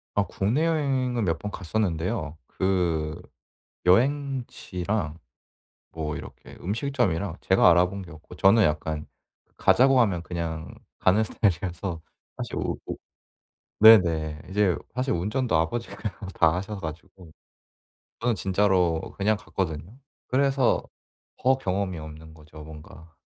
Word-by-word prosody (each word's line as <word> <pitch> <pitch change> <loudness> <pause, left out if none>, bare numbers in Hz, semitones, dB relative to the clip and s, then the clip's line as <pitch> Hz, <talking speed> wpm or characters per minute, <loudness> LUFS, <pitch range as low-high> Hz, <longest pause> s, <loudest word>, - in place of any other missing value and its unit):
아 100 - +3
국내여행은 130 0 0
몇 80 -3 0
번 105 +2 -5
갔었는데요 90 -3 -2
그 85 -4 -1 0.6
여행지랑 110 - 0 0.7
뭐 75 -2 -4
이렇게 - - -10
음식점이랑 100 - -1
제가 95 - +5
알아본 90 +3 +2
게 85 - -12
없고 80 +3 -13
저는 100 +5 +5
약간 75 -1 -1 0.5
가자고 130 0 +5
하면 95 -7 +1
그냥 85 -2 -4 0.3
가는 100 +4 +4
스타일이라서 90 -4 -1 0.4
사실 - - -5
우 - - -2
우 - - -4 0.9
네네. 80 -8 +6
이제 95 -3 +2 0.2
사실 130 +1 0
운전도 105 +8 -1
아버지가 85 +9 -1 0.4
다 80 0 +3
하셔 100 +3 -4
가지고 85 +2 -9 0.9
저는 120 0 +1
진짜로 95 -4 +2 0.2
그냥 105 +1 +2
갔거든요. 90 - -4 0.3
그래서 135 -1 +2 0.5
더 130 +1 +3
경험이 95 -6 -2
없는 80 +1 -10
거죠 75 -1 -13
뭔가. 80 +1 -13
95 Hz, 260 characters per minute, -26 LUFS, 80-110 Hz, 0.9 s, 네네